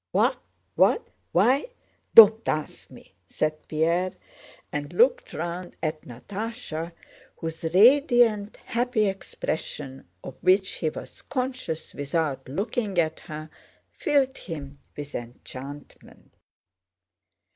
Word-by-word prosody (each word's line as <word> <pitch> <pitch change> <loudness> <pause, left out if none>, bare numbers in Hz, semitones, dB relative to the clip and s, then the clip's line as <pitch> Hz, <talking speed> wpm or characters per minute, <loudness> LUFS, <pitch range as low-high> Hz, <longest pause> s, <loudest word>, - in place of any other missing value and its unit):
"What? - - +3 0.4
What? 450 - +3 0.2
Why? 275 - +3 0.5
Don't 220 0 +9
ask 155 -1 -3
me," - - -16 0.2
said 155 0 -2
Pierre, 170 +4 +1 0.6
and 145 -1 -4
looked - - +3
round 175 +1 -5
at 155 -1 -2
Natásha 175 - -6 0.5
whose 160 0 -5
radiant, 235 - +5
happy 240 -2 +1
expression—of 135 - -5
which 185 +1 +3
he 160 - 0
was - - -10
conscious 255 - -4
without 145 -2 -2
looking 200 - -2
at 160 -2 +1
her—filled 260 - -3
him 145 -5 -7 0.2
with 145 0 -7
enchantment. 130 +4 -10
170 Hz, 95 wpm, -26 LUFS, 155-230 Hz, 0.6 s, Don't